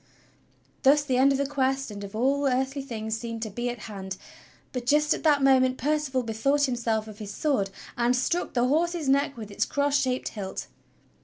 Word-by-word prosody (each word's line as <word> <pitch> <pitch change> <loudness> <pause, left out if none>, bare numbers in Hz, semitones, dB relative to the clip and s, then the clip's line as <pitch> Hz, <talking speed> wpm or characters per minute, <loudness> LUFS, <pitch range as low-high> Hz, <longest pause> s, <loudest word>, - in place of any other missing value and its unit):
Thus 285 +2 +5
the 260 -3 0
end 270 +2 +5
of 275 - +2
the 280 - 0
Quest 270 -2 0
and 205 0 -7
of 200 +1 -8
all 275 +5 +2
earthly 265 +2 0
things 220 -4 -4
seemed 230 0 -5
to 220 - -5
be 240 +4 -2
at 240 -3 -6
hand, 190 -3 -6 0.5
but 250 -2 -5
just 300 +3 +4
at - - -4
that 290 -3 +3
moment 260 -1 +4
Percival 290 -3 0
bethought 240 +6 +1
himself 235 -4 0
of 215 0 -11
his 205 -2 -6
sword, 205 -5 0 0.3
and 240 +1 +2
struck 300 +7 -1
the 240 0 +3
horse's 330 +2 +1
neck 280 0 +2
with 215 -2 -8
its - - 0
cross 285 0 0
shaped 255 -1 -1
hilt. 195 -3 -5
255 Hz, 200 wpm, -27 LUFS, 225-280 Hz, 0.5 s, Thus